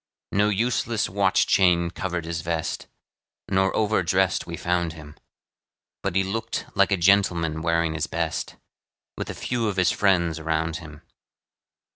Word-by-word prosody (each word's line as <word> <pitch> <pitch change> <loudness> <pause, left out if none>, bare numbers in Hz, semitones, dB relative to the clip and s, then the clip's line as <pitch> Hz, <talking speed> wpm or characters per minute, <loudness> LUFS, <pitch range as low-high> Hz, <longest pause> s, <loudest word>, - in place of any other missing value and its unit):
No 105 +1 +3
useless 115 +1 0
watch 95 0 +2
chain 85 -3 +3
covered 90 -2 -3
his 85 0 -3
vest, 80 -1 -3 0.6
Nor 95 0 +2
over 110 -1 +2
dressed 95 +2 +1
we 85 -1 -5
found 85 -1 -1
him; 75 -2 -12 0.9
But - - -2
he 95 - +3
looked 115 +4 -3
like 100 0 +3
a 100 - +3
gentleman 85 -4 +2
wearing 85 -1 +1
his 80 0 -2
best, 85 -1 -3 0.6
With - - -5
a - - -5
few 120 -2 -2
of 100 - -1
his 90 -3 +3
friends 85 -5 +2
around 80 +1 -1
him. 75 -3 -12
90 Hz, 150 wpm, -24 LUFS, 80-100 Hz, 0.9 s, No